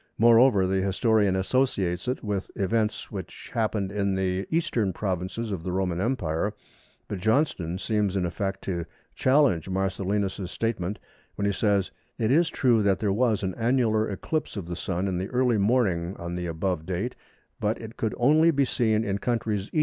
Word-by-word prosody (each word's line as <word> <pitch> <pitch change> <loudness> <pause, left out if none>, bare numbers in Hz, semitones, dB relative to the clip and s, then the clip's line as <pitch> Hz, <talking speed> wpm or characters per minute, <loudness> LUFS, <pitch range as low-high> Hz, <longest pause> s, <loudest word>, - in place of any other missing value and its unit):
Moreover, 115 -3 +6
the 95 +1 +1
historian 100 0 +2
associates 95 -4 0
it 125 - -2
with 100 -3 -2
events 105 +2 -1
which 95 -3 -8
happened 110 -4 0
in 100 -1 0
the 95 0 -1
eastern 125 - 0
provinces 95 +4 -3
of 95 -4 -3
the 90 - -4
Roman 90 -1 -1
Empire; 100 -5 -1 0.5
but 100 - -4
Johnston 105 - +1
seems 105 -1 0
in 95 -2 +1
effect 95 +2 -3
to 85 -3 -3 0.3
challenge 130 - +3
Marcellinus's 95 0 -1
statement 105 -3 -2 0.4
when 100 - -2
he 100 - +2
says, 100 -1 +1 0.3
"It 110 +1 +1
is 165 +3 +4
true 120 -4 +3
that 100 -2 +3
there 100 -1 0
was 110 -2 +1
an 95 -1 -1
annular 115 -2 +1
eclipse 130 - -3
of 95 - -4
the 85 0 -5
Sun 90 +2 -2
in 90 -2 -1
the 95 - -3
early 125 -3 +2
morning 100 -5 +1
on 85 0 -5
the 90 0 -3
above 85 0 -2
date, 95 +7 -2 0.4
but 105 +2 0
it 110 0 -9
could 110 - -2
only 155 +6 +5
be 140 -4 +3
seen 110 -4 +1
in 100 -2 -1
countries 110 -4 -1
E. 155 - +1
100 Hz, 175 wpm, -26 LUFS, 95-115 Hz, 0.5 s, Moreover